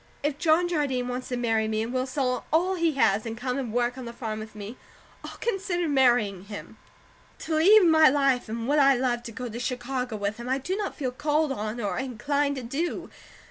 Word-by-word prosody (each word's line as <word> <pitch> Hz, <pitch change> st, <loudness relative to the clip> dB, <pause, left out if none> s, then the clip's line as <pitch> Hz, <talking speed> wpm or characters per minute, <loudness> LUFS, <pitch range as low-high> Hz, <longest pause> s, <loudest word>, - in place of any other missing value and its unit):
If 295 Hz, 0 st, -1 dB
John 330 Hz, +2 st, +3 dB
Jardine 280 Hz, -7 st, -1 dB
wants 250 Hz, +1 st, -4 dB
to 250 Hz, -, -3 dB
marry 225 Hz, -2 st, +1 dB
me, 220 Hz, 0 st, -1 dB
and 235 Hz, +2 st, -5 dB
will 255 Hz, 0 st, 0 dB
sell 255 Hz, -2 st, -1 dB
all 350 Hz, +5 st, +2 dB
he 335 Hz, -3 st, +1 dB
has, 220 Hz, -6 st, +2 dB
and 225 Hz, 0 st, -5 dB
come 250 Hz, +2 st, -2 dB
and 245 Hz, -5 st, -4 dB
work 245 Hz, +2 st, 0 dB
on 255 Hz, -, -7 dB
the 235 Hz, -, -6 dB
farm 220 Hz, -3 st, -4 dB
with 215 Hz, 0 st, -9 dB
me, 210 Hz, +3 st, -7 dB, 0.5 s
I'll -, -, -8 dB
consider 390 Hz, -6 st, -1 dB
marrying 240 Hz, -9 st, +2 dB
him. 205 Hz, 0 st, -9 dB, 0.6 s
To 320 Hz, -, -3 dB
leave 395 Hz, +5 st, +7 dB
my 315 Hz, -2 st, +7 dB
life 270 Hz, -4 st, +1 dB
and 230 Hz, +1 st, -4 dB
what 295 Hz, +2 st, +3 dB
I 275 Hz, -1 st, +6 dB
love 245 Hz, -1 st, 0 dB
to 240 Hz, -1 st, -8 dB
go 250 Hz, +2 st, -6 dB
to 235 Hz, +1 st, -6 dB
Chicago 250 Hz, -1 st, -3 dB
with 205 Hz, +1 st, -2 dB
him, 240 Hz, +1 st, -6 dB
I 260 Hz, -, +2 dB
do 360 Hz, +8 st, -3 dB
not 410 Hz, -1 st, -3 dB
feel 260 Hz, -4 st, -2 dB
called 295 Hz, +2 st, 0 dB
on, 215 Hz, -1 st, -4 dB
or 205 Hz, 0 st, -2 dB
inclined 280 Hz, +3 st, -1 dB
to 260 Hz, -, -5 dB
do. 285 Hz, +9 st, -3 dB
255 Hz, 220 wpm, -26 LUFS, 235-295 Hz, 0.6 s, leave